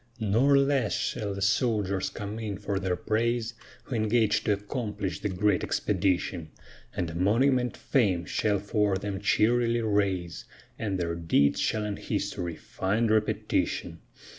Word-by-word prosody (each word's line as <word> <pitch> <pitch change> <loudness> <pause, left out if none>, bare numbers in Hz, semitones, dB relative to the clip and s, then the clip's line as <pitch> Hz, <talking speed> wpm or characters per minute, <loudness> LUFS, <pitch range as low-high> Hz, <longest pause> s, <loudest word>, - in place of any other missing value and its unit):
Nor 120 +7 +3
less 140 -5 +2
shall 100 -2 -2
the 100 - -3
soldiers 105 -3 +1
come 105 +2 -6
in 105 -4 -4
for 100 -1 -2
their 95 -2 -1
praise, 115 +3 -1 0.3
Who - - -7
engaged 110 0 +2
to 105 - +3
accomplish 105 - -4
the 105 - -2
great 95 0 +1
expedition; 90 -4 0 0.5
And 85 -2 -2
a - - -8
monument 125 +7 +2
Fame 95 -10 +1
shall 105 +3 +1
for 100 0 0
them 100 0 -4
cheerily 115 +3 +2
raise, 100 -6 -1 0.3
And 100 -4 -1
their 85 -2 -1
deeds 80 -4 +2
shall 110 -1 0
in 105 -1 -3
history 85 -2 -3
find 110 +4 -1
repetition. 110 -1 0
105 Hz, 140 wpm, -28 LUFS, 95-115 Hz, 0.5 s, Nor